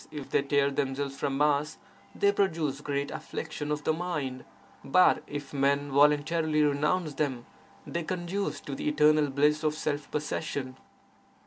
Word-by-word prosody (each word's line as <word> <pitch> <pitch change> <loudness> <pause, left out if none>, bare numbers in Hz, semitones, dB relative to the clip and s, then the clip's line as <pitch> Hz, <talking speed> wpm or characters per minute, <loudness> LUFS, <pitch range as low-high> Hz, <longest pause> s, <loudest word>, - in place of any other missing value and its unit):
if 150 -3 -8
they - - +3
tear 140 0 +2
themselves 135 0 -2
from 135 0 -2
us, 150 +1 +1 0.4
they 200 - +3
produce 160 -8 0
great 140 -1 -2
affliction 150 -2 -5
of 150 0 -2
the 160 - +2
mind; 150 -7 -3 0.4
but 180 +7 +4
if 145 -1 -6
men 140 +1 +1
voluntarily 150 +2 +3
renounce 150 +3 +1
them, 135 -4 -2 0.4
they 170 - -3
conduce 175 -2 -3
to 140 - -7
the 135 - -2
eternal 150 0 +4
bliss 150 +3 +2
of 155 -1 +1
self 150 -1 -3
possession. 145 -3 -3
150 Hz, 145 wpm, -28 LUFS, 140-155 Hz, 0.4 s, but